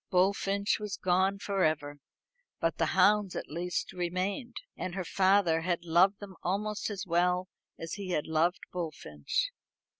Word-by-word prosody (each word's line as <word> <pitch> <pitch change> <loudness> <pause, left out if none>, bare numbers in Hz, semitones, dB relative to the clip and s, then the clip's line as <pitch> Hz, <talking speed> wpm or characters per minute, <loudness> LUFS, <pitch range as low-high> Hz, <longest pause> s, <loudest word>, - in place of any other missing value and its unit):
Bullfinch 200 +2 +2
was 210 -2 -4
gone 185 +2 +2
for 200 -1 -1
ever, 145 -2 0 0.6
but - - 0
the - - +3
hounds 205 -2 +4
at - - -5
least 175 +3 -3
remained; 185 +7 -2 0.2
and 185 -1 -4
her 190 -2 -3
father 190 -3 +3
had 175 0 -1
loved 185 +4 +4
them 200 -2 -9
almost 210 +4 -1
as 205 -1 -4
well 180 +1 +1 0.3
as 165 0 -6
he 200 -2 -5
had 155 -4 0
loved 160 +3 +1
Bullfinch. 155 - -2
185 Hz, 150 wpm, -30 LUFS, 170-200 Hz, 0.6 s, hounds